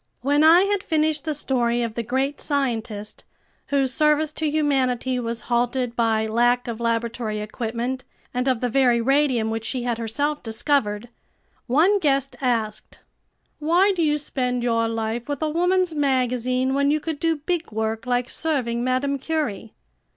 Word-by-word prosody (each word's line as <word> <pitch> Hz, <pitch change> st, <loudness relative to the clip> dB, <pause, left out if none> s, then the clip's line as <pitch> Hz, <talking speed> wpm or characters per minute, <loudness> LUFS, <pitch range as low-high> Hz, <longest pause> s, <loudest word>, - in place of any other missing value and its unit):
When 290 Hz, +4 st, +2 dB
I 330 Hz, +3 st, +8 dB
had 400 Hz, 0 st, +1 dB
finished 310 Hz, -3 st, 0 dB
the 310 Hz, -2 st, -1 dB
story 240 Hz, -4 st, 0 dB
of 230 Hz, -2 st, -3 dB
the 235 Hz, -, -2 dB
great 265 Hz, +5 st, -2 dB
scientist, 225 Hz, -7 st, -3 dB, 0.4 s
whose 270 Hz, -2 st, +1 dB
service 300 Hz, +2 st, +2 dB
to 310 Hz, -1 st, -1 dB
humanity 260 Hz, -4 st, +1 dB
was 230 Hz, -1 st, -3 dB
halted 245 Hz, +1 st, -1 dB
by 225 Hz, -2 st, +1 dB
lack 240 Hz, +3 st, +2 dB
of 230 Hz, -1 st, -4 dB
laboratory 230 Hz, -1 st, -1 dB
equipment, 235 Hz, +4 st, -4 dB, 0.3 s
and 250 Hz, +1 st, -1 dB
of 255 Hz, -3 st, +1 dB
the 250 Hz, -, +1 dB
very 245 Hz, -1 st, +3 dB
radium 255 Hz, -3 st, +2 dB
which 225 Hz, 0 st, -3 dB
she 245 Hz, +2 st, -3 dB
had 240 Hz, -1 st, -2 dB
herself 290 Hz, +7 st, -2 dB
discovered, 225 Hz, -2 st, -1 dB, 0.6 s
one 335 Hz, +11 st, +4 dB
guest 275 Hz, -5 st, 0 dB
asked: 220 Hz, -4 st, -2 dB, 0.6 s
"Why 345 Hz, +6 st, +3 dB
do 370 Hz, -3 st, -1 dB
you 300 Hz, -2 st, +2 dB
spend 250 Hz, -4 st, -2 dB
your 230 Hz, -1 st, +1 dB
life 225 Hz, +2 st, -3 dB
with 285 Hz, +2 st, -2 dB
a 310 Hz, -, +1 dB
woman's 355 Hz, +1 st, +1 dB
magazine 255 Hz, -2 st, 0 dB
when 280 Hz, +1 st, +2 dB
you 305 Hz, +1 st, +2 dB
could 315 Hz, -1 st, -4 dB
do 330 Hz, 0 st, +1 dB
big 325 Hz, +1 st, -3 dB
work 220 Hz, +2 st, -3 dB
like 245 Hz, 0 st, +1 dB
serving 250 Hz, -8 st, -1 dB
Madame 265 Hz, +2 st, 0 dB
Curie?" 265 Hz, -9 st, -3 dB
255 Hz, 160 wpm, -23 LUFS, 235-295 Hz, 0.6 s, I